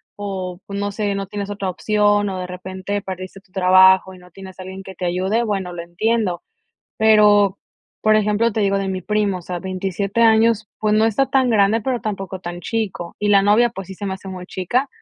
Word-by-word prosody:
o, 190 -3 -5
pues, 200 0 -5
no 205 0 -2
sé, 205 -1 -1
no 195 0 -4
tienes 200 0 -5
otra 200 -2 -3
opción, 205 +2 +1
o 190 -1 -4
de 180 - -4
repente 185 +2 -5
perdiste 185 0 -7
tu 190 - -33
trabajo 190 0 +5
y - - -13
no 180 0 -17
tienes 190 +1 -11
alguien 190 +1 -8
que 190 0 -11
te 180 - -4
ayude, 190 +6 0
bueno, 195 -5 -2
lo 175 - -5
entiendo. 185 +2 -1 0.6
Pero, 210 -2 +5 0.4
por 215 0 +3
ejemplo, 215 +2 +2
te 220 - -1
digo 200 -1 +2
de 195 - -2
mi 190 -1 -3
primo, 205 -1 0
o - - -12
sea, 180 +1 -5
27 190 +3 -3
años, 220 -1 +4
pues, 215 -1 +1
no 215 +1 +4
está 225 +5 +2
tan 260 -2 +2
grande, 215 0 +3
pero 245 +1 -2
tampoco 195 -2 -4
tan 175 -1 -7
chico, 200 -5 -4
y 210 - -2
la 200 -1 +5
novia, 215 +4 +4
pues, 195 -5 -8
sí 190 - -7
se 200 +2 -6
me 190 - -2
hace 190 0 -10
muy 185 -1 -7
chica, 240 +11 -1
195 Hz, 220 wpm, -20 LUFS, 185-210 Hz, 0.6 s, trabajo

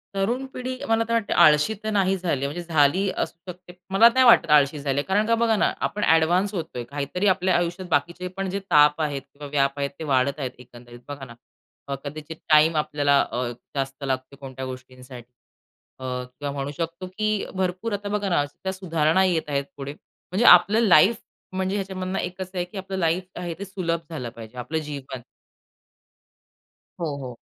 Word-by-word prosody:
तरुण 235 +7 0
पिढी 255 0 -4
मला 225 0 +2
तर 230 - -1
वाटते 230 -3 0
आळशी 150 +7 +5
तर 220 - -2
नाही 195 -2 +2
झाली 165 -7 -2
आहे - - +1
म्हणजे 175 +2 -5
झाली 160 +7 +3
असू 170 +3 -4
शकते. 180 0 -15 0.2
मला 195 +4 +7
नाही 260 +1 +5
वाटत 235 -9 +6
आळशी 145 0 +4
झाली 140 -1 -2
आहे - - -1
कारण 205 +3 +2
का 230 - +3
बघा 230 -1 +2
ना - - +2 0.2
आपण 210 - -5
ॲडव्हान्स 175 +5 +3
होतोय 160 -9 -4
काहीतरी 145 - -2
आपल्या 185 -1 +2
आयुष्यात 175 +1 -2
बाकीचे 170 +4 0
पण 195 -1 -2
जे 200 - -2
ताप 150 +1 +5
आहेत 145 -3 -1
किंवा 140 +2 -12
व्याप 140 -1 +1
आहेत 140 0 -1
ते - - -5
वाढत 140 0 +1
आहेत 130 -3 -3
एकंदरीत 120 -1 -14
बघा 140 -2 -7
ना. 120 - -12 0.5
अ, 140 - -2
कदाचित 150 +2 -7
टाईम 155 +1 +5
आपल्याला 145 -2 +2
अ, 125 0 -2 0.3
जास्त 135 0 -3
लागते 130 0 -3
कोणत्या 130 -1 -8
गोष्टींसाठी. 130 -1 -10 0.7
अ, - - -10
किंवा 125 +2 -5
म्हणू 140 0 -4
शकतो 170 +3 -4
की 215 0 +1 0.2
भरपूर 185 +4 -2
आता 205 0 -3
बघा 205 -1 -1
ना 175 -5 +2
त्या 190 +6 -6
सुधारणा 165 -1 +1
येत 165 -5 0
आहेत 140 -1 -1
पुढे. 140 0 -6 0.4
म्हणजे 205 +6 +1
आपलं 190 +5 +7
लाईफ 190 +6 +6 0.4
म्हणजे 190 +1 -1
ह्याच्यामधनं 190 -1 -3
एकच 180 +1 -5
असं 185 0 -10
आहे 175 - 0
की 180 +3 -11
आपलं 190 0 -5
लाईफ 170 +1 +1 0.2
आहे 175 -1 -4
ते 200 - -5
सुलभ 180 -4 -2
झालं 135 -8 -5
पाहिजे, 115 +1 -11
आपलं 125 +6 -3
जीवन. 135 -3 -7 1.8
हो, 155 -4 -2
हो. 125 -1 -7
160 Hz, 190 wpm, -24 LUFS, 140-190 Hz, 1.8 s, मला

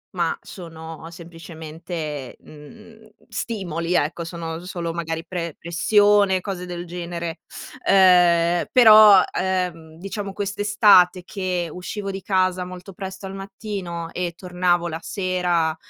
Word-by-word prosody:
ma 170 -2 0
sono 165 -2 -10
semplicemente, 165 -3 -8
mhmm, 220 +9 -15 0.2
stimoli 175 -6 -3
ecco, 165 +2 0
sono 165 -1 -6
solo 170 -2 -4
magari 165 -1 -4
pre 170 -3 -5
pressione, 200 +3 +3
cose 180 -1 -6
del 175 0 -6
genere. 170 -1 -5 0.5
Ehm, 175 -2 +5
però, 215 -5 +8
ehm, 180 -4 -2
diciamo 195 +2 -5
quest'estate 200 -3 +3
che 185 -2 -3
uscivo 195 +3 -5
di 195 0 -6
casa 185 -1 +1
molto 180 +1 -10
presto 190 +1 -8
al 190 - -7
mattino 195 -4 -6
e 175 -1 -3
tornavo 180 -1 0
la 160 -1 -5
sera 180 -5 -1
180 Hz, 115 wpm, -22 LUFS, 170-195 Hz, 0.5 s, però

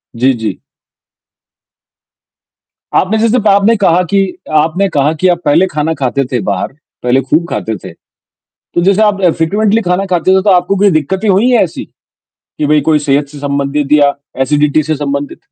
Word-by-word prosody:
जी, 130 +3 +2
जी। 110 -3 -5 2.4
आपने 210 +4 0
जैसे 230 +2 +2
प 215 - -1
आपने 200 +3 +4
कहा 180 -1 +3
कि 195 +3 +1 0.4
आपने 165 +6 0
कहा 145 +1 +2
कि 185 - +2
आप 170 - -7
पहले 165 +6 +3
खाना 155 0 -2
खाते 135 +1 0
थे 125 - 0
बाहर, 100 - -1 0.4
पहले 125 +2 +2
खूब 155 +6 0
खाते 110 - -3
थे, - - -8 0.6
तो - - -5
जैसे 195 +2 +3
आप 205 -2 +1
अ, 180 - +3
फ्रेक्वेंटली 205 +7 0
खाना 185 +1 -1
खाते 185 +1 +1
थे 190 - +2
तो 205 - +2
आपको 180 +1 +2
कोई 200 +1 +3
दिक्कतें 185 +6 -1
हुई 200 +6 +3
हैं 240 -3 +4
ऐसी? 175 - -4 0.7
कि 150 - 0
भाई 150 +1 +3
कोई 150 - +3
सेहत 145 0 0
से 145 +1 -12
संबंधित 140 0 -2
या 145 -1 +4 0.3
एसिडिटी 150 +2 +1
से 155 +1 -2
संबंधित? 140 0 -4
160 Hz, 180 wpm, -12 LUFS, 145-195 Hz, 2.4 s, आपने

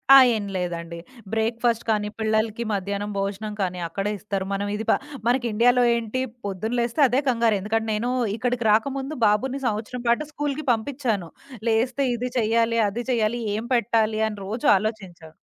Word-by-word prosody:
ఆ! - - +12 0.2
ఏం 210 -2 -3
లేదండి. 170 -2 -4 0.3
బ్రేక్‌ఫాస్ట్ 230 +1 +1
కానీ, 210 -1 +1
పిల్లలకి 220 +1 0
మధ్యాహ్నం 200 +1 -2
భోజనం 200 +2 -3
కానీ 180 -1 -2
అక్కడే 195 +4 -2
ఇస్తారు. 195 0 -3
మనం 200 +1 -1
ఇది 220 +2 -4
ప - - +6 0.3
మనకి 245 +1 +2
ఇండియాలో 245 +3 +4
ఏంటి 235 +2 -2 0.2
పొద్దున 205 +4 -3
లేస్తే 235 +4 0
అదే 250 +2 +2
కంగారు, 230 -3 +2
ఎందుకంటే 220 +3 -1
నేను 220 +3 -1 0.3
ఇక్కడికి 245 0 -1
రాకముందు 270 +6 0
బాబుని 255 +6 +1
సంవత్సరం 225 +3 -3
పాటు 235 +6 +2
స్కూలుకి 295 0 -3
పంపించాను, 225 - -1 0.4
లేస్తే 245 +5 +1
ఇది 250 +2 -3
చేయాలి, 230 0 +2
అది 235 +4 -4
చేయాలి 235 0 +1
ఏం 220 - -3
పెట్టాలి 220 -1 +1
అని 210 -1 -5
రోజు 225 +4 -4
ఆలోచించా. 190 -6 -5
220 Hz, 155 wpm, -24 LUFS, 210-240 Hz, 0.4 s, ఆ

